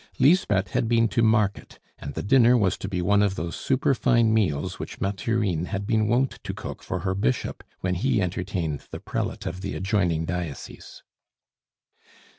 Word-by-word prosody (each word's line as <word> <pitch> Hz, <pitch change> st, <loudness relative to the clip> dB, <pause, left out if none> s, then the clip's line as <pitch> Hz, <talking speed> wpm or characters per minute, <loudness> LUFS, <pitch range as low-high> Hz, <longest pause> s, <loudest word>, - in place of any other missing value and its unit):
Lisbeth 125 Hz, -, +3 dB
had -, -, 0 dB
been 115 Hz, -1 st, +4 dB
to 115 Hz, -, +1 dB
market, 110 Hz, -3 st, +1 dB, 0.2 s
and 70 Hz, -1 st, -7 dB
the -, -, -3 dB
dinner 125 Hz, +2 st, +5 dB
was 95 Hz, -5 st, +2 dB
to 95 Hz, -, -6 dB
be 90 Hz, -3 st, -2 dB
one 100 Hz, +3 st, +3 dB
of 100 Hz, -2 st, +1 dB
those 85 Hz, -1 st, -4 dB
superfine 125 Hz, -3 st, +2 dB
meals 90 Hz, -10 st, 0 dB
which -, -, -7 dB
Mathurine 100 Hz, -3 st, -1 dB
had 100 Hz, 0 st, -4 dB
been 110 Hz, -1 st, +1 dB
wont 125 Hz, +4 st, +1 dB
to -, -, -5 dB
cook -, -, -7 dB
for 95 Hz, -2 st, -4 dB
her 95 Hz, +1 st, -1 dB
Bishop 95 Hz, -10 st, -1 dB, 0.2 s
when 90 Hz, 0 st, 0 dB
he 110 Hz, +7 st, +1 dB
entertained 90 Hz, -5 st, -3 dB
the -, -, -7 dB
prelate -, -, -4 dB
of 90 Hz, +3 st, -4 dB
the 100 Hz, -, -4 dB
adjoining 90 Hz, -5 st, 0 dB
diocese. 85 Hz, -3 st, -6 dB
100 Hz, 170 wpm, -25 LUFS, 90-115 Hz, 0.2 s, dinner